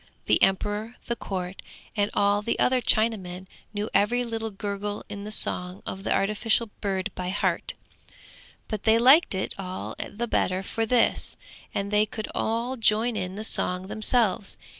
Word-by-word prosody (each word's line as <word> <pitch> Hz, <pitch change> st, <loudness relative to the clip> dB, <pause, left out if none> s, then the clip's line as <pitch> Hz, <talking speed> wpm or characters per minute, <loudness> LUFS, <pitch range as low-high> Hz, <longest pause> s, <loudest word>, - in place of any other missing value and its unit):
The -, -, +3 dB
emperor, 205 Hz, +4 st, +1 dB
the 235 Hz, -, -1 dB
court, 185 Hz, -3 st, -5 dB, 0.3 s
and 205 Hz, 0 st, +1 dB
all 205 Hz, 0 st, +3 dB
the 220 Hz, -, -1 dB
other 255 Hz, 0 st, +3 dB
Chinamen 195 Hz, -6 st, +1 dB, 0.3 s
knew 210 Hz, 0 st, -2 dB
every 245 Hz, +5 st, +3 dB
little 225 Hz, -1 st, -3 dB
gurgle 205 Hz, 0 st, -4 dB
in 205 Hz, 0 st, -6 dB
the -, -, -5 dB
song 180 Hz, -3 st, -1 dB
of 190 Hz, +1 st, -5 dB
the -, -, -2 dB
artificial 215 Hz, +2 st, +2 dB
bird 190 Hz, -2 st, -1 dB
by 180 Hz, 0 st, -4 dB
heart; 195 Hz, -, -1 dB, 0.9 s
but 215 Hz, -2 st, -3 dB
they 220 Hz, 0 st, +4 dB
liked 260 Hz, -, +6 dB
it 190 Hz, -, -2 dB
all 185 Hz, -1 st, -5 dB
the 235 Hz, +3 st, -4 dB
better 185 Hz, -3 st, 0 dB
for 225 Hz, +3 st, -2 dB
this, 240 Hz, 0 st, +2 dB, 0.3 s
and 200 Hz, +1 st, -3 dB
they 210 Hz, +1 st, +3 dB
could 215 Hz, 0 st, -5 dB
all 235 Hz, +4 st, -1 dB
join 225 Hz, +1 st, +2 dB
in 185 Hz, -2 st, -3 dB
the 215 Hz, -, -5 dB
song 185 Hz, -3 st, 0 dB
themselves. 215 Hz, -2 st, +2 dB
210 Hz, 160 wpm, -26 LUFS, 195-225 Hz, 0.9 s, liked